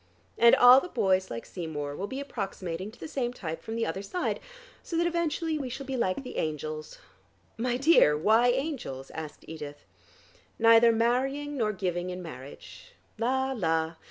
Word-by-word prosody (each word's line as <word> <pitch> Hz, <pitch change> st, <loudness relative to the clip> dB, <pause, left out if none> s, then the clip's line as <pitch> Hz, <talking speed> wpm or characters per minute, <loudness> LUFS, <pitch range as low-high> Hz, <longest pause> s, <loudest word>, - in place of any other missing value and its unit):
And 235 Hz, 0 st, +7 dB
all 245 Hz, +1 st, +9 dB
the -, -, -6 dB
boys 190 Hz, -, +1 dB
like 115 Hz, 0 st, -6 dB
Seymour 150 Hz, -5 st, -5 dB
will 200 Hz, -, -4 dB
be 265 Hz, +5 st, -5 dB
approximating 195 Hz, -8 st, -5 dB
to 220 Hz, -, -17 dB
the -, -, -6 dB
same 250 Hz, -5 st, -2 dB
type 165 Hz, -7 st, -6 dB
from 225 Hz, -, -6 dB
the 230 Hz, -, 0 dB
other 165 Hz, +4 st, -3 dB
side, 350 Hz, -, -2 dB, 0.4 s
so 335 Hz, -, -4 dB
that 340 Hz, -, +2 dB
eventually 330 Hz, -2 st, -1 dB
we 265 Hz, -3 st, -4 dB
shall 270 Hz, +3 st, -6 dB
be 265 Hz, 0 st, -3 dB
like 235 Hz, +1 st, -1 dB
the 250 Hz, -, -8 dB
angels 155 Hz, 0 st, -4 dB, 0.3 s
" -, -, -37 dB
"My 245 Hz, -, +1 dB
dear, 265 Hz, -, +5 dB
why 220 Hz, +9 st, +4 dB
angels?" 245 Hz, -, -2 dB
asked 155 Hz, -2 st, -8 dB
Edith. 145 Hz, -2 st, -8 dB, 0.7 s
"Neither 230 Hz, +1 st, +6 dB
marrying 265 Hz, +6 st, 0 dB
nor 220 Hz, -5 st, +1 dB
giving 180 Hz, -3 st, -2 dB
in 180 Hz, 0 st, -6 dB
marriage. 160 Hz, -, -11 dB, 0.3 s
La, 265 Hz, +3 st, +1 dB
la! 165 Hz, -8 st, 0 dB
225 Hz, 175 wpm, -28 LUFS, 165-265 Hz, 0.7 s, all